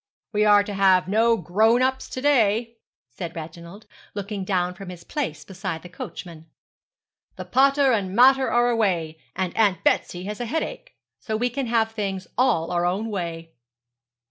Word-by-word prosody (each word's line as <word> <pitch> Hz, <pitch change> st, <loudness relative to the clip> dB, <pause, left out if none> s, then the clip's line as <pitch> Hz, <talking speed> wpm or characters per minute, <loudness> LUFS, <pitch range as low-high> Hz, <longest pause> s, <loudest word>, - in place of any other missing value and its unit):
'We 210 Hz, 0 st, +2 dB
are 205 Hz, -1 st, +6 dB
to 205 Hz, -, -6 dB
have 190 Hz, -2 st, +4 dB
no 225 Hz, +3 st, +3 dB
grown 220 Hz, +8 st, +2 dB
ups 260 Hz, 0 st, -1 dB
to 255 Hz, -, -5 dB
day,' 230 Hz, -4 st, +2 dB, 0.3 s
said 170 Hz, -3 st, -7 dB
Reginald, 170 Hz, +5 st, -9 dB, 0.3 s
looking 200 Hz, -1 st, -4 dB
down 180 Hz, -2 st, 0 dB
from 190 Hz, 0 st, -10 dB
his 175 Hz, -2 st, -10 dB
place 230 Hz, -, -4 dB
beside 190 Hz, -4 st, -5 dB
the 180 Hz, -, -10 dB
coachman. 170 Hz, -2 st, -9 dB, 0.9 s
'The -, -, -7 dB
pater 275 Hz, +1 st, +3 dB
and 195 Hz, -4 st, -1 dB
mater 265 Hz, +2 st, +5 dB
are 240 Hz, 0 st, +3 dB
away, 175 Hz, -8 st, 0 dB, 0.2 s
and 185 Hz, -2 st, -2 dB
Aunt 205 Hz, -4 st, +2 dB
Betsy 175 Hz, 0 st, +1 dB
has 210 Hz, +2 st, -6 dB
a 240 Hz, -, -3 dB
headache; 325 Hz, -, -4 dB, 0.2 s
so 215 Hz, -1 st, -3 dB
we 245 Hz, +2 st, 0 dB
can 270 Hz, 0 st, -3 dB
have 225 Hz, -1 st, +1 dB
things 195 Hz, -4 st, -4 dB
all 230 Hz, -10 st, +1 dB
our 175 Hz, -1 st, 0 dB
own 195 Hz, +6 st, -1 dB
way.' 165 Hz, -4 st, -5 dB
205 Hz, 170 wpm, -24 LUFS, 180-235 Hz, 0.9 s, are